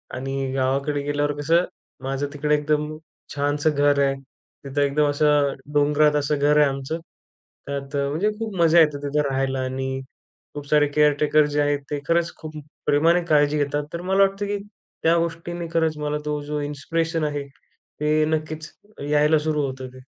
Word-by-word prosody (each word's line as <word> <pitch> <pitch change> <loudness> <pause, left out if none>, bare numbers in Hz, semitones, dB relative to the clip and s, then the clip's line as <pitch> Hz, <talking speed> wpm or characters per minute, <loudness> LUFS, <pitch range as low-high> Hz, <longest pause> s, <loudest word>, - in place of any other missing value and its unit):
आणि 135 +1 -3
गावाकडे 140 +2 0
गेल्यावर 145 0 0
कसं, 165 +4 +3 0.4
माझं 135 +1 -2
तिकडे 150 +1 +1
एकदम 150 +1 -1 0.4
छानसं 145 +2 +1
घर 145 0 +3
आहे, 135 0 +1 0.5
तिथं 140 +1 -1
एकदम 145 +1 +2
असं 145 -1 +3 0.2
डोंगरात 150 +1 +3
असं 145 0 +1
घर 150 +1 +3
आहे 150 -1 +6
आमचं. 135 +4 -4 0.7
त्यात 140 0 -5
म्हणजे 145 +9 0
खूप 220 -3 -4
मजा 170 0 +5
येते, 150 -3 +4
तिथं 145 +1 +1
राहायला 135 0 -1
आणि 130 0 -3 0.5
खूप 145 -1 -7
सारे 150 0 +4
केअर 150 +1 +4
टेकर 150 0 +4
जे 150 - +3
आहेत, 145 0 +1
ते 145 - -1
खरंच 170 0 +1
खूप 155 -1 -9 0.3
प्रेमाने 165 +4 +3
काळजी 150 -2 +3
घेतात. 145 0 0
तर 170 - -4
मला 190 +2 +3
वाटतं 195 +1 0
की 205 0 -1 0.5
त्या 165 +1 +4
गोष्टींनी 170 +1 -3
खरंच 160 -2 +1
मला 150 0 -2
तो, 150 0 -2
जो 150 0 -3
इन्स्पिरेशन 160 +3 -2
आहे, 145 -1 -2 0.6
ते 150 +1 +2
नक्कीच 155 0 -3 0.4
यायला 150 +1 +4
सुरू 150 -1 0
होतं 130 -1 -6
ते. 130 - -12
150 Hz, 165 wpm, -23 LUFS, 145-155 Hz, 0.7 s, आहे